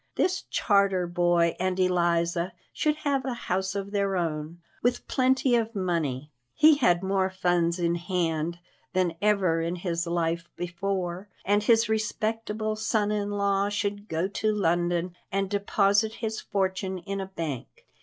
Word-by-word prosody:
This 370 +1 0
Charter 200 -3 +2
boy 175 -1 +2
and 185 0 0
Eliza 175 -1 +1 0.2
should 300 -1 +1
have 275 -2 +1
a 260 -2 -2
house 190 -3 -2
of 200 0 -4
their 200 -2 0
own, 160 -1 -3 0.2
with 245 +1 0
plenty 260 -1 +3
of 230 -1 0
money 155 -7 -1 0.2
he 310 -1 +6
had 175 -8 +3
more 190 0 +1
funds 175 -2 +1
in 170 -1 +1
hand 170 -2 -1 0.4
than 180 -2 +1
ever 195 -6 +2
in 170 +2 -1
his 170 -1 -2
life 170 0 -1
before 180 +1 -3 0.2
and 205 +2 +3
his 225 +1 +4
respectable 215 0 -1
son 215 -1 0
in 205 -1 -1
law 200 -1 +1
should 205 0 -3
go 165 +3 0
to 215 +2 0
London 175 -2 0 0.2
and 195 0 -1
deposit 205 +1 +2
his 220 -1 -4
fortune 190 -1 -1
in 195 +2 -4
a 190 - -5
bank. 165 -9 -6
190 Hz, 150 wpm, -27 LUFS, 175-210 Hz, 0.4 s, he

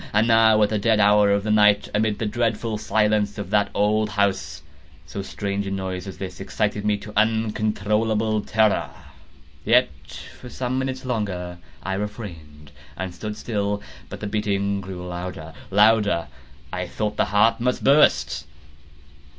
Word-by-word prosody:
And 105 +2 +3
now 115 -1 +5
at 105 - +2
the 110 - -1
dead 110 +1 +2
hour 105 0 +5
of 100 0 +2
the 110 - -1
night, 105 -1 +4
amid 105 0 +1
the 115 - -2
dreadful 115 0 -1
silence 105 -1 +1
of 100 -2 -6
that 105 -1 +2
old 105 +1 +2
house, 100 -2 -1 0.4
so 100 - -6
strange 100 0 -3
a - - -2
noise 95 -1 -4
as 95 - -8
this 90 -3 -7
excited 105 +1 -2
me 105 -1 +1
to 105 +1 -10
uncontrollable 110 0 +1
terror. 110 0 +1 0.7
Yet, 120 -3 +4 0.5
for 125 - -10
some 130 +1 -2
minutes 130 0 -4
longer 90 -7 -3 0.2
I 95 - -2
refrained 85 -8 -7 0.3
and 95 0 -4
stood 105 +3 -6
still. 105 -3 -2 0.3
But - - -8
the - - -4
beating 100 -1 -1
grew 95 -2 -7
louder, 90 -2 -6 0.2
louder! 105 -5 +3 0.4
I 90 0 -3
thought 105 +3 -3
the - - +3
heart 110 +3 +3
must 125 +1 -1
burst. 75 - +3
105 Hz, 155 wpm, -23 LUFS, 95-110 Hz, 0.7 s, now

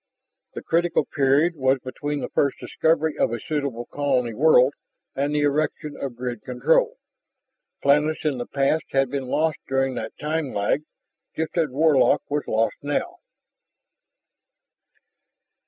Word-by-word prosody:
The - - -6
critical 170 +1 +1
period 145 +4 +2
was 130 -2 +2
between 145 +3 -4
the - - -4
first 140 -2 +1
discovery 160 -1 0
of - - +2
a 120 - -3
suitable 140 -4 -3
colony 130 -5 -1
world 135 0 +5 0.4
and 140 +2 0
the 150 - +2
erection 150 +1 -1
of 135 -3 -5
grid 120 -2 -5
control. 485 - +1 0.9
Planets 150 +3 +2
in 140 -5 0
the 120 - -4
past 140 +3 0
had 135 -2 +2
been 135 -2 -3
lost 155 +2 0
during 135 0 0
that 110 -2 -6
time 150 -2 -3
lag, 100 +8 +1 0.5
just 160 0 -3
as 165 -4 +1
Warlock 145 +1 +3
was 145 0 -1
lost 110 +1 0
now. 250 - -2
145 Hz, 140 wpm, -24 LUFS, 130-155 Hz, 0.9 s, world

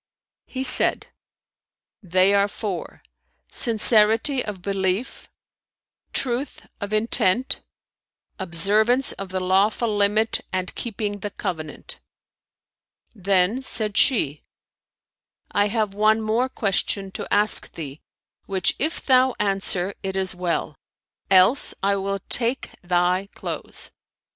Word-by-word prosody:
He 260 0 -4
said 255 - +4 0.9
"They 185 +1 +3
are 200 0 +3
four: 200 -4 -6 0.5
sincerity 225 +3 +4
of 195 -4 -7
belief, 195 +4 -2 0.8
truth 255 +2 -3
of 205 -1 -5
intent, 215 +2 +1 0.8
observance 210 +8 +2
of 195 -1 -8
the 185 0 -2
lawful 205 +4 +1
limit 210 +2 +1
and 185 -1 -3
keeping 205 -3 -4
the 205 - -4
covenant." 160 -7 -6 1.1
Then 195 +3 +1
said 215 -5 -2
she, 155 - +3 1.1
"I 205 0 +2
have 210 -2 -1
one 215 +2 +3
more 225 +4 0
question 195 -3 -2
to - - -7
ask 210 +1 +2
thee, 145 -2 -8 0.5
which 190 -2 +1
if 315 +4 -2
thou 260 -1 +4
answer, 195 -2 0
it 190 0 -4
is 190 -1 +1
well; 175 -5 -3 0.5
else, 190 +7 +4
I 200 0 +2
will 195 0 -3
take 240 +2 0
thy 180 +2 0
clothes." - - -5
200 Hz, 110 wpm, -23 LUFS, 185-225 Hz, 1.1 s, said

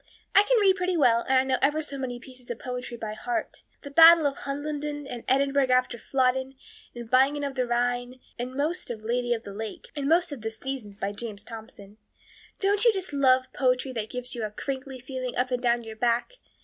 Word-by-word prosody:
I - - +8
can - - +4
read 390 -2 +4
pretty 365 -1 0
well 235 -6 +4
and 265 - +5
I 260 - +4
know 265 -1 0
ever 295 +3 +2
so 285 -1 -6
many 255 -3 -4
pieces 255 -1 -15
of 240 - -3
poetry 250 -1 -6
off - - -23
by 215 -1 -3
heart 355 +8 -4 0.2
'The 285 - -8
Battle 330 +1 +8
of 280 -1 +1
Hohenlinden' 290 +1 -4
and 245 -3 -7
'Edinburgh 275 0 +2
after 255 -1 +2
Flodden,' 260 +2 0 0.4
and 240 -1 -7
'Bingen 270 +4 +3
of 280 -1 -2
the 255 -2 -1
Rhine,' 245 +1 -1 0.2
and 250 +2 -4
most 310 +6 -1
of 225 -3 -5
the 220 - -9
'Lady 245 +1 0
of 230 -2 0
the 200 - -8
Lake' 220 +1 -7
and 285 -1 -2
most 345 +1 +3
of 280 -5 -6
'The 220 - -2
Seasons' 225 -3 -6
by 200 0 -2
James 205 -1 -7
Thompson. 215 -2 -11 0.6
Don't 405 +1 +2
you 475 - +7
just 380 -6 -4
love 260 -2 +4
poetry 255 0 +1
that 220 -3 -4
gives 250 0 -4
you 235 - -4
a 215 - -2
crinkly 265 +4 -5
feeling 255 0 -5
up 250 +1 0
and 250 -1 0
down 240 -1 +1
your 220 -1 -9
back? 235 - +1
255 Hz, 225 wpm, -27 LUFS, 240-285 Hz, 0.6 s, I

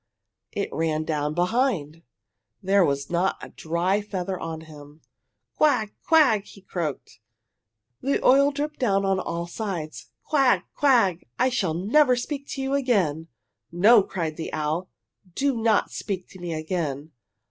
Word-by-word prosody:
It - - -3
ran 155 -1 0
down 150 -1 -2
behind! 180 - 0 0.6
There 195 +1 +4
was 140 -2 -1
not 175 +2 +1
a - - -9
dry 175 +5 -1
feather 190 -2 -4
on 160 -1 -5
him! 150 -1 -14 0.5
"Quag! 250 -9 +2
Quag!" 280 -11 +5 0.2
croaked 150 - -4 0.8
he, 275 - 0
the - - -1
oil 275 +2 +6
dripping 295 +1 -4
down 195 -6 +2
on 195 -1 +1
all 170 -1 -3
sides. 175 -4 -5
"Quag! 275 -5 +3
Quag! 230 - +2
I 255 - +3
shall 190 -10 -1
never 250 - +3
speak 280 +3 -4
to 270 - -4
you 270 +1 -2
again!" 195 - +1 0.4
"No," 205 +6 +6
cried 165 -5 -4
the 160 - -5
owl. 155 +4 -2 0.5
"Do 275 -1 +1
not 225 -2 +2
speak 190 -3 -4
to 190 - -13
me 175 -1 -5
again. 155 -2 -3
185 Hz, 145 wpm, -25 LUFS, 160-245 Hz, 0.8 s, oil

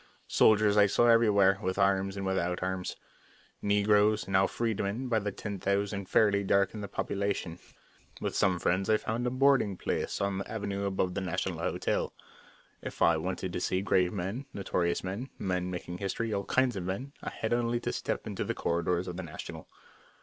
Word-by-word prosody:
Soldiers 105 -1 +4
I 100 -1 +7
saw 110 +4 +3
everywhere, 105 -5 +5
with 95 -1 -2
arms 95 0 +2
and 100 - -3
without 90 -1 -1
arms. 95 0 -3 0.7
Negroes, 105 0 +3
now 95 0 +3
freedmen, 115 +2 -2
by 115 -2 +3
the 105 0 -3
ten 100 0 -6
thousand 100 0 -1
fairly 100 -2 +3
darkened 100 +2 +1
the - - -4
population. 100 -4 -2 0.6
With - - -3
some 95 -1 +3
friends 95 +4 0
I 110 - +5
found 115 +3 -2
a - - +2
boarding 130 -6 +3
place - - -2
on 100 -1 -1
the 100 - -6
avenue 100 -2 -3
above 95 -2 -1
the 100 - -2
National 95 -3 -2
Hotel. - - -1 0.7
If - - -3
I 85 -1 +5
wanted 90 +2 -3
to - - -2
see 95 - 0
great 90 -2 +2
men, 100 +8 -4
notorious 85 -3 -1
men, 100 +8 -4
men 90 -1 -1
making 90 0 -5
history, 110 +3 -2
all 100 -1 -2
kinds 130 -3 +2
of 95 - -3
men, 120 +10 -4
I - - -4
had 110 - -3
only 120 0 +1
to - - -2
step - - -3
into - - -3
the - - -3
corridors 85 +1 0
of 90 - -5
the - - -3
National. 80 -2 -8
100 Hz, 185 wpm, -30 LUFS, 95-105 Hz, 0.7 s, I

